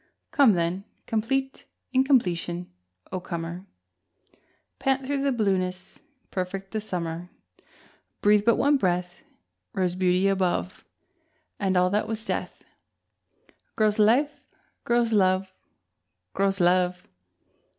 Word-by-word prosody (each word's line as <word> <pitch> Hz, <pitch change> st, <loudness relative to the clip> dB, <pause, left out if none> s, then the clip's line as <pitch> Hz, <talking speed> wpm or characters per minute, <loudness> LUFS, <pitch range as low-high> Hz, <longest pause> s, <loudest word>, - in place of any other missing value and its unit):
Come 270 Hz, -7 st, +5 dB
then, 175 Hz, +2 st, -1 dB, 0.2 s
complete 265 Hz, +5 st, -2 dB, 0.3 s
incompletion, 180 Hz, -10 st, +1 dB, 0.4 s
O 185 Hz, -, -2 dB
comer, 170 Hz, +2 st, -6 dB, 1.1 s
Pant 270 Hz, 0 st, 0 dB
through 280 Hz, 0 st, -1 dB
the 280 Hz, 0 st, +1 dB
blueness, 190 Hz, -4 st, -1 dB, 0.3 s
perfect 190 Hz, +1 st, -4 dB
the 220 Hz, -, -2 dB
summer! 175 Hz, -3 st, -4 dB, 0.9 s
Breathe 210 Hz, 0 st, +4 dB
but 230 Hz, +1 st, +4 dB
one 285 Hz, +1 st, +3 dB
breath 180 Hz, -4 st, -1 dB, 0.5 s
Rose 185 Hz, -2 st, 0 dB
beauty 185 Hz, +1 st, +2 dB
above, 185 Hz, -1 st, 0 dB, 0.8 s
And 190 Hz, -2 st, +1 dB
all 180 Hz, 0 st, +3 dB
that 210 Hz, +1 st, 0 dB
was 225 Hz, 0 st, -4 dB
death -, -, -4 dB, 1.1 s
Grows 215 Hz, -1 st, +2 dB
life, 250 Hz, +8 st, +3 dB, 0.4 s
grows 235 Hz, -1 st, +2 dB
love, 190 Hz, -1 st, +2 dB, 0.8 s
Grows 195 Hz, 0 st, +1 dB
love! 180 Hz, 0 st, +2 dB
195 Hz, 105 wpm, -26 LUFS, 180-225 Hz, 1.1 s, Come